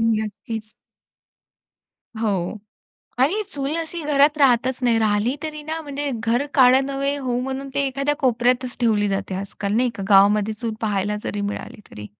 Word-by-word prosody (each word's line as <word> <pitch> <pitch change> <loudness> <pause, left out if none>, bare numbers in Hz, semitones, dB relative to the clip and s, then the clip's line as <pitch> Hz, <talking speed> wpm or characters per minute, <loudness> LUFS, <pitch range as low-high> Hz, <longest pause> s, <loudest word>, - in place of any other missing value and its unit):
नक्कीच. 220 0 -2 1.4
हो. 210 -2 -1 0.6
आणि 395 +10 +2
चूल 285 -1 -3
अशी 330 0 -4
घरात 290 0 +3
राहतच 255 -2 +3
नाही 235 -2 +3
राहिली 215 +3 +1
तरी 305 -1 -5
ना, 320 +2 -4
म्हणजे 285 -1 -4
घर 240 +5 +1
काळं 260 0 +6
नव्हे 275 +1 -1
होवो 255 -3 -2
म्हणून 265 +1 -4
ते 280 - +1
एखाद्या 275 +2 -1
कोपऱ्यातच 250 0 +1
ठेवली 210 -3 +2
जाते 195 -1 -2
आजकाल, 200 +1 -4
नाही 245 +2 +2
का? 195 - -6
गावामध्ये 205 +2 +5
चूल 225 0 -4
पहायला 210 -1 -1
जरी 205 - -3
मिळाली 205 +1 -5
तरी. 105 0 -9
245 Hz, 150 wpm, -22 LUFS, 210-275 Hz, 1.4 s, काळं